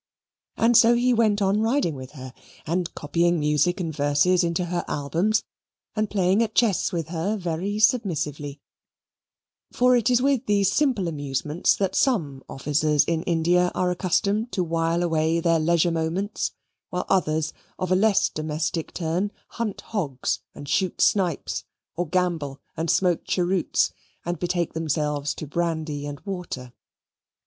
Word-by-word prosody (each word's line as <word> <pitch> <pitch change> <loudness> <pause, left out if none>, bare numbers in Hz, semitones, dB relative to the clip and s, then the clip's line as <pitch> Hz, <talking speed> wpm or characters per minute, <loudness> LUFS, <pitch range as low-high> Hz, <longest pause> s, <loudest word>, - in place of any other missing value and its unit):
And 235 +1 +3
so 230 +1 +7
he 245 +1 +3
went 215 -3 +2
on 195 +2 +2
riding 225 - +1
with 130 0 -9
her, 130 -3 -9 0.3
and 175 +2 -1
copying 170 +3 +1
music 150 +5 +1
and 165 -4 -3
verses 150 +5 +3
into 170 +1 0
her 175 0 -2
albums, 170 +10 0 0.5
and 215 -1 0
playing 195 +1 +2
at 220 -1 -1
chess 225 -6 +2
with 165 -3 -3
her 180 +6 -1
very 180 +3 -2
submissively; 150 - 0 1.1
for 250 0 +4
it 240 -2 +2
is 245 -1 +4
with 270 -1 +1
these 200 -2 +3
simple 255 -11 +1
amusements 145 +1 0
that 195 -2 -1
some 155 - 0
officers 150 +2 +1
in 165 -1 -1
India 175 +1 +2
are 180 -1 +1
accustomed 200 +5 0
to 185 - +1
while 165 +1 0
away 160 -1 +1
their 165 -1 +2
leisure 170 +1 +2
moments, 165 +6 -1 0.4
while 180 0 -3
others 155 -4 +1 0.2
of 185 -1 -3
a - - +5
less 200 0 +3
domestic 155 +1 -3
turn 180 +4 -1 0.2
hunt 230 -4 -4
hogs, 135 - -2 0.2
and 145 - -9
shoot 185 +5 0
snipes, 180 -7 +1 0.3
or 175 +1 -2
gamble 165 -5 -1 0.2
and 165 +1 -2
smoke 180 -3 +2
cheroots, 180 -1 +1 0.3
and 175 -1 -2
betake 175 -1 -1
themselves 150 -3 -1
to - - -6
brandy 155 -2 -2
and 145 -1 -7
water. 175 -11 -6
175 Hz, 150 wpm, -24 LUFS, 155-200 Hz, 1.1 s, so